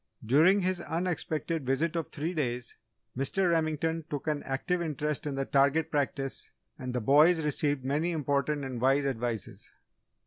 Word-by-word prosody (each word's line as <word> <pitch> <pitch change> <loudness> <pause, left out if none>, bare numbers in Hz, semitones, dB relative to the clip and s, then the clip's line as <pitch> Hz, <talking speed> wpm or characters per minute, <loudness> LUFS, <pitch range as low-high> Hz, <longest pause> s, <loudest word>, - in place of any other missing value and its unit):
During 160 - +5
his 185 -1 0
unexpected 165 -2 -2
visit 135 +6 0
of 165 -2 -2
three 160 +5 -4
days, 125 -6 -2 0.4
Mr. 170 +8 +2
Remington 160 0 0
took 145 -2 -4
an 150 -2 -1
active 175 +7 -1
interest 150 -2 -2
in 140 - -3
the 135 0 -1
target 140 +4 +2
practice 140 -2 -1 0.3
and 125 -1 -5
the - - +1
boys 155 +6 +5
received 145 -2 0
many 150 +5 0
important 145 -2 -1
and 125 -3 -5
wise 135 +2 +3
advices. 120 -5 -3
150 Hz, 150 wpm, -29 LUFS, 135-165 Hz, 0.4 s, During